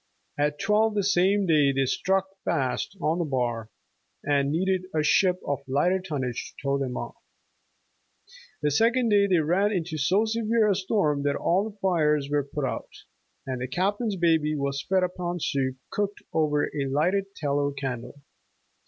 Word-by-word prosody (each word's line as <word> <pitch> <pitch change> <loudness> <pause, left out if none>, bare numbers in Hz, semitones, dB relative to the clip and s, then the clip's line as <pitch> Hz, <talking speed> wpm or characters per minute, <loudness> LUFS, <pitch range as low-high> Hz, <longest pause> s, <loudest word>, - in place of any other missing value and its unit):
At 145 0 0
twelve 215 +1 +2
the 205 - +1
same 195 +1 +3
day 150 -5 +4
they 135 0 +1
stuck 190 +8 +1 0.2
fast 135 +8 -1
on 165 +1 0
a - - +1
bar, 120 -6 -2 0.5
and 140 -1 +1
needed 185 +3 0
a 155 - +2
ship 180 +4 +3
of 140 0 -1
lighter 175 +8 +2
tonnage 135 -9 -3
to - - -16
tow 140 0 +2
them 130 -3 -3
off. - - -6 1.5
The 150 - +2
second 235 - +3
day 200 -1 +4
they 185 -2 +3
ran 185 +7 +2
into 165 -5 -2
so 190 +10 +2
severe 225 0 +1
a 205 - +4
storm 185 -7 0
that 145 0 0
all 200 +4 0
fires 150 -6 +2
were 145 -1 +2
put 140 +1 -4
out, 125 - -4 0.6
and 130 -2 -4
the 130 - -2
Captain's 200 - -1
baby 160 -4 +2
was 140 0 -2
fed 190 -1 +3
upon 175 -1 -3
soup 130 -4 -1
cooked 205 0 -2
over 150 -2 +2
a 140 -2 -2
lighted 190 +8 0
tallow 145 -1 0
candle. 135 0 -6
160 Hz, 165 wpm, -26 LUFS, 140-195 Hz, 1.5 s, day